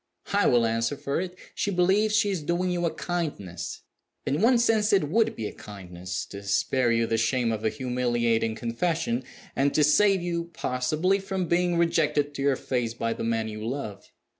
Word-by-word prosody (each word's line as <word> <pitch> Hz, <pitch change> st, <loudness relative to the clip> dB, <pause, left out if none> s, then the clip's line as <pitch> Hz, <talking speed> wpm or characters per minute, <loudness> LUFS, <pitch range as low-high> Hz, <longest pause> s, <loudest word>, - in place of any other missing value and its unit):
I 205 Hz, 0 st, +4 dB
will 120 Hz, -2 st, +4 dB
answer 115 Hz, +4 st, 0 dB
for 140 Hz, +5 st, -2 dB
it, 180 Hz, -1 st, -5 dB, 0.2 s
she -, -, -1 dB
believes 200 Hz, +3 st, +2 dB
she 205 Hz, -1 st, +3 dB
is 185 Hz, -4 st, -2 dB
doing 175 Hz, +4 st, 0 dB
you 175 Hz, -1 st, 0 dB
a -, -, -1 dB
kindness. 100 Hz, -, -4 dB, 0.4 s
In 145 Hz, +5 st, 0 dB
one 240 Hz, +3 st, +5 dB
sense 220 Hz, -3 st, +3 dB
it 190 Hz, -7 st, +3 dB
would 225 Hz, +5 st, +2 dB
be 110 Hz, -, -4 dB
a -, -, -5 dB
kindness 90 Hz, -3 st, -7 dB
to 100 Hz, -, -7 dB
spare 120 Hz, +5 st, +1 dB
you 115 Hz, 0 st, +2 dB
the 115 Hz, 0 st, 0 dB
shame 120 Hz, 0 st, +1 dB
of 110 Hz, -1 st, -3 dB
a 110 Hz, -, +2 dB
humiliating 120 Hz, -1 st, 0 dB
confession, 120 Hz, +2 st, -1 dB, 0.3 s
and 140 Hz, +1 st, +1 dB
to 150 Hz, -, +4 dB
save 195 Hz, +7 st, +4 dB
you 170 Hz, -1 st, -2 dB
(possibly) 155 Hz, +10 st, 0 dB
from 190 Hz, -1 st, -2 dB
being 175 Hz, 0 st, +2 dB
rejected 160 Hz, -4 st, +1 dB
to 140 Hz, -, -5 dB
your 140 Hz, -1 st, +3 dB
face 120 Hz, -3 st, -2 dB
by 115 Hz, -1 st, -1 dB
the -, -, -5 dB
man 115 Hz, -1 st, 0 dB
you 110 Hz, 0 st, -6 dB
love. 110 Hz, -5 st, -5 dB
140 Hz, 190 wpm, -26 LUFS, 115-175 Hz, 0.4 s, one